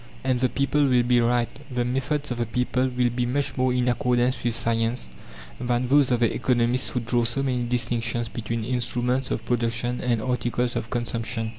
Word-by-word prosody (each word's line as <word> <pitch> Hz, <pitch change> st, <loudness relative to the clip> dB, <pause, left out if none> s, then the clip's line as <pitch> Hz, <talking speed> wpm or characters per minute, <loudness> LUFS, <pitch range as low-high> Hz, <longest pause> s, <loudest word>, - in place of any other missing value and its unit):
And 130 Hz, -2 st, +1 dB
the 130 Hz, 0 st, +2 dB
people 140 Hz, +2 st, +1 dB
will 125 Hz, -2 st, +4 dB
be 120 Hz, 0 st, +3 dB
right. 120 Hz, 0 st, +2 dB, 0.2 s
The 125 Hz, -2 st, -1 dB
methods 135 Hz, +3 st, -1 dB
of 120 Hz, -, -3 dB
the 120 Hz, -, -1 dB
people 125 Hz, +2 st, 0 dB
will 125 Hz, -1 st, 0 dB
be 120 Hz, 0 st, -1 dB
much 140 Hz, +3 st, -1 dB
more 130 Hz, 0 st, +2 dB
in 125 Hz, 0 st, +1 dB
accordance 125 Hz, +1 st, +1 dB
with 120 Hz, -1 st, 0 dB
science 115 Hz, -, 0 dB, 0.5 s
than 120 Hz, 0 st, 0 dB
those 140 Hz, -1 st, +5 dB
of 120 Hz, -2 st, +1 dB
the 115 Hz, -, +3 dB
economists 125 Hz, 0 st, +1 dB
who 125 Hz, -, -2 dB
draw 120 Hz, +1 st, +1 dB
so 120 Hz, +4 st, 0 dB
many 125 Hz, -3 st, 0 dB
distinctions 120 Hz, -1 st, 0 dB
between 115 Hz, 0 st, -4 dB
instruments 125 Hz, +2 st, -1 dB
of -, -, -3 dB
production 120 Hz, 0 st, -1 dB
and 120 Hz, -2 st, +1 dB
articles 120 Hz, 0 st, -1 dB
of 115 Hz, -, -3 dB
consumption. 115 Hz, -1 st, -2 dB
120 Hz, 190 wpm, -25 LUFS, 120-125 Hz, 0.5 s, those